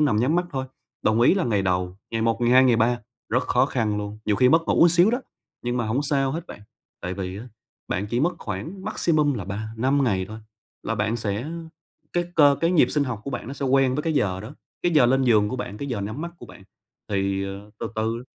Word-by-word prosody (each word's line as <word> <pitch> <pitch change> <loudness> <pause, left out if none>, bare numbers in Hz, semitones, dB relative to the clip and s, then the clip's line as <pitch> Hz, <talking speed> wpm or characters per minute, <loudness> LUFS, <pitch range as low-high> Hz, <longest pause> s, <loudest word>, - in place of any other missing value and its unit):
nằm 145 -8 +3
nhắm 125 +9 +2
mắt 175 0 +1
thôi. 130 -1 -2 0.4
Đồng 110 +2 +2
ý 125 - +6
là 195 - 0
ngày 105 -5 +1
đầu, 90 0 -1
ngày 115 -1 -1
một, 115 0 +1
ngày 120 0 +2
hai, 130 +1 +7
ngày 125 -3 +4
ba, 120 +2 +2 0.3
rất - - +1
khó - - +2
khăn 105 -2 -1
luôn, 105 +1 -5
nhiều 105 -2 +1
khi 125 +2 +5
mất 165 +4 +5
ngủ - - +2
một 170 - +8
xíu 175 +5 +5
đó, 245 +3 0 0.4
nhưng 120 0 -1
mà 120 -3 -1
hổng 125 +6 0
sao 135 -2 +1
hết 165 +2 -5
bạn. - - -10 0.4
Tại 90 +1 -4
vì 95 0 -5
á, 120 +4 -9 0.4
bạn 100 +3 -1
chỉ 120 +4 -1
mất 175 +3 +1
khoảng 115 - -6
maximum 150 -4 +1
là 100 -6 -4
3-5 110 +7 -1
ngày 95 -5 +1
thôi 110 +1 -8 0.4
là 115 - -2
bạn 110 +2 0
sẽ 110 +5 -3 0.6
cái 175 0 +1
cơ 145 -3 +6
cái 165 +1 +2
nhịp 175 - +4
sinh 145 -2 +1
học 120 -5 -4
của 140 - -4
bạn 120 - -5
nó - - -5
sẽ 140 0 -3
quen 130 -1 +3
với 150 - -1
cái 160 0 0
giờ 95 -9 0
đó, 110 +8 -9 0.3
cái 175 - +1
giờ 140 -6 +6
lên 135 +2 +3
giường 105 -4 +4
của 130 - -3
bạn, 105 -5 -5
cái 140 - -4
giờ 120 -6 -2
nhắm 110 +8 -4
mắt 170 0 -4
của - - -11
bạn. 100 - -14 0.5
Thì, 100 -1 0
ờ, 100 +2 -8
từ 115 - -3
từ 115 +2 -2
120 Hz, 255 wpm, -24 LUFS, 105-140 Hz, 0.6 s, một